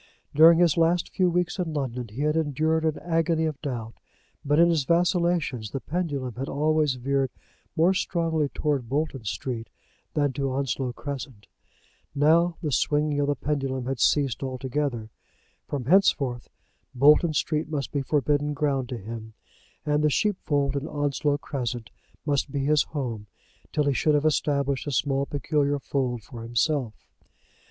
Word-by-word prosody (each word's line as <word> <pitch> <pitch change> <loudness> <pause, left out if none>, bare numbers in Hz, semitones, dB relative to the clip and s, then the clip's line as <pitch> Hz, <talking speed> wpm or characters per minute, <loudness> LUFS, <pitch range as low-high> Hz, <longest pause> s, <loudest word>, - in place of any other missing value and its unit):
During 165 +3 +8
his 170 -2 +3
last 170 +1 +2
few 185 -1 +2
weeks 180 +2 -1
in 170 -3 -2
London 125 -4 -3
he 110 +6 -7
had 150 +1 +1
endured 160 +1 +1
an 155 -1 0
agony 165 -1 +1
of 155 -3 -4
doubt; 120 -6 -4 0.5
but 145 +1 +2
in 170 +1 +6
his 160 -4 +1
vacillations 170 - +1
the 135 - -4
pendulum 145 -6 -3
had 135 +2 -4
always 150 -1 +1
veered 135 +1 0 0.5
more 170 +4 +4
strongly 165 -5 0
towards 145 -5 -1
Bolton 140 -2 -2
Street 115 +2 -4 0.5
than 145 -3 +1
to 135 0 -2
Onslow 135 -1 -1
Crescent. 135 -6 -7 0.7
Now 165 +4 +3
the 150 - -1
swinging 150 +1 +1
of 145 - +1
the 145 - +1
pendulum 135 -3 -2
had 135 -1 -3
ceased 140 0 +2
altogether. 130 -3 -3 0.6
From 135 -4 -4
henceforth 135 - +2 0.5
Bolton 150 +5 +5
Street 155 0 -1
must 145 -4 -3
be 140 - -1
forbidden 145 +1 0
ground 135 -4 0
to 125 - -4
him, 110 +1 -8 0.5
and 150 0 +1
the 150 - +4
sheepfold 145 - 0
in 140 +2 -2
Onslow 145 -1 0
Crescent 120 -5 -4 0.3
must 140 -2 0
be 135 -1 -1
his 150 0 +4
home 120 -8 -4 0.4
till 150 - +1
he 140 -1 +2
should 150 +3 +2
have 145 +1 +1
established 140 -2 +1
a - - -1
small 135 0 0
peculiar 145 0 0
fold 130 -4 -2
for 115 +1 -10
himself. 120 0 0
145 Hz, 155 wpm, -26 LUFS, 130-155 Hz, 0.7 s, During